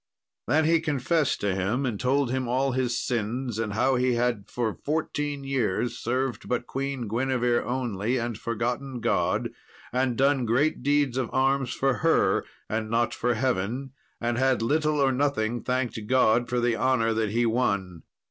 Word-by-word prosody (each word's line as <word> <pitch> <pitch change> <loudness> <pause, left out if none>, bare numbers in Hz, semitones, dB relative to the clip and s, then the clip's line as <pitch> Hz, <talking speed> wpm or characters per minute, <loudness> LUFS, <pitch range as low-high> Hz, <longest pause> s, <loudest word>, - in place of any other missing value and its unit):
Then 155 +1 +3
he 165 +1 +4
confessed 150 -1 0
to 100 -2 +1
him, 100 +8 -1
and 110 -6 -2
told 130 0 +1
him 130 -1 -1
all 130 +3 +1
his 125 -1 0
sins, 120 0 -2
and 110 -2 -2
how 130 +4 +2
he 125 0 +2
had 120 -4 -1
for 115 -3 -1
fourteen 145 0 -3
years 120 -3 -1
served 130 +2 -2
but 125 -1 -1
Queen 135 -3 -3
Guinevere 120 +1 +1
only, 120 -2 -1
and 120 -1 -2
forgotten 120 +4 -3
God, - - 0 0.4
and 125 -2 +1
done 135 -2 +2
great 135 +8 +1
deeds 145 -3 +1
of 130 -3 -1
arms 135 -1 +1
for 135 -2 +1
her, 165 0 +2 0.2
and 110 0 -2
not 115 +1 +1
for 120 0 0
Heaven, 125 +2 -1 0.3
and 120 0 -1
had 130 -3 +2
little 150 +4 +1
or 135 -1 +3
nothing 125 -4 0
thanked 125 -2 -1
God 120 -1 +3
for 125 - 0
the 120 -1 +1
honour 115 -1 +2
that 110 -1 0
he 120 +3 +1
won. 100 -7 0
125 Hz, 165 wpm, -26 LUFS, 115-135 Hz, 0.4 s, he